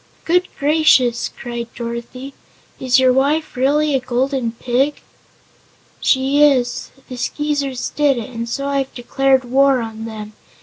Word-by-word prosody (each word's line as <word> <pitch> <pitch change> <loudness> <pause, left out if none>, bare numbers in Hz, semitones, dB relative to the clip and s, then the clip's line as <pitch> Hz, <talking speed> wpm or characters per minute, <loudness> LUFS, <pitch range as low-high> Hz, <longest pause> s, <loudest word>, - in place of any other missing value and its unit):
"Good 360 +2 +2
gracious!" 285 -5 +3
cried 240 -2 -6
Dorothy; 235 +3 -6 0.5
"is 255 0 +3
your 260 -1 +4
wife 290 +4 0
really 290 +4 +2
a 270 - +2
Golden 255 -1 -1
Pig?" 255 +5 0 1.0
"She 270 +2 +2
is. 255 -5 +2 0.2
The 255 - -8
Skeezers 285 -1 -2
did 290 -3 +2
it 235 +1 -6
and 230 -1 -5
so 275 +4 -3
I 280 0 0
have 270 -1 -4
declared 265 +1 +1
war 270 +1 +3
on 225 -1 -6
them. 215 -1 -8
260 Hz, 140 wpm, -18 LUFS, 240-280 Hz, 1.0 s, your